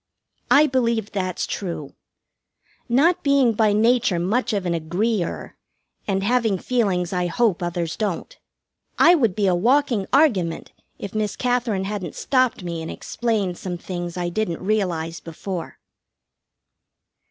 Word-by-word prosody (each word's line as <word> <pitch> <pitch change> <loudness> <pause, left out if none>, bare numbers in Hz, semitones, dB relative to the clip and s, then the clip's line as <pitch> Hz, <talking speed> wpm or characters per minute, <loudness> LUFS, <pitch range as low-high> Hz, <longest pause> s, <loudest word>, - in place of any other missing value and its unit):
I 295 +2 +6
believe 235 -6 0
that's 185 -3 -2
true. 170 -7 -5 1.0
Not 300 +9 +3
being 280 -4 +3
by 215 -1 +3
nature 225 -1 +3
much 220 +9 0
of 200 -3 -1
an 175 - 0
agree 175 +6 0
er, - - -6 0.5
and 195 -1 0
having 225 -2 +2
feelings 190 -6 0
I 180 -1 0
hope 195 0 +1
others 175 -2 -2
don't, 205 -5 -3 0.6
I 345 - +7
would 230 - +2
be 210 - +1
a 185 - +3
walking 235 +2 +2
argument 205 - +2 0.3
if 200 - -7
Miss 215 -1 -1
Katherine 245 -5 0
hadn't 195 -4 -4
stopped 255 -7 +1
me 170 -2 -4
and 160 - -6
explained 210 -7 -2
some 180 -2 -4
things 175 0 -5
I 175 -1 -1
didn't 180 -2 -3
realize 175 -6 -1
before. 170 +2 -6
200 Hz, 140 wpm, -22 LUFS, 175-235 Hz, 1.0 s, I